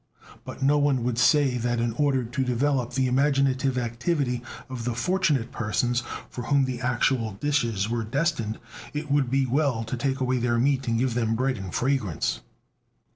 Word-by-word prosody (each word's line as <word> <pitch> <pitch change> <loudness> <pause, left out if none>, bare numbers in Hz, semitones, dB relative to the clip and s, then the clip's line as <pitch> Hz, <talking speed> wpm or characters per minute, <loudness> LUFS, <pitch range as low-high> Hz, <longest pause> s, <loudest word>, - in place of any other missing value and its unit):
But - - -7
no 145 +2 +4
one 140 -4 +2
would 120 -1 -1
say 135 -1 +4
that 120 0 0
in 115 -1 0
order 135 0 +1
to 120 +3 -2
develop 125 0 0
the 130 +1 +1
imaginative 135 0 +2
activity 125 +2 -1 0.3
of 130 -3 -6
the 120 0 -2
fortunate 140 -3 +1
persons 120 +2 0 0.3
for 125 - -7
whom 140 +2 +3
the 130 -1 -4
actual 120 -3 +1
dishes 115 -4 0
were 115 0 -1
destined, 120 -3 -1 0.4
it 150 -1 -4
would 140 -3 +2
be 135 +1 +2
well 130 -3 +1
to 115 +3 -4
take 135 +2 -1
away 130 -1 +1
their 120 0 +1
meat 135 +1 +1
and 115 -1 +1
give 125 0 +1
them 115 -2 0
bread 130 +2 0
and 95 -2 -6
fragrance. 120 - 0
125 Hz, 180 wpm, -26 LUFS, 120-140 Hz, 0.4 s, no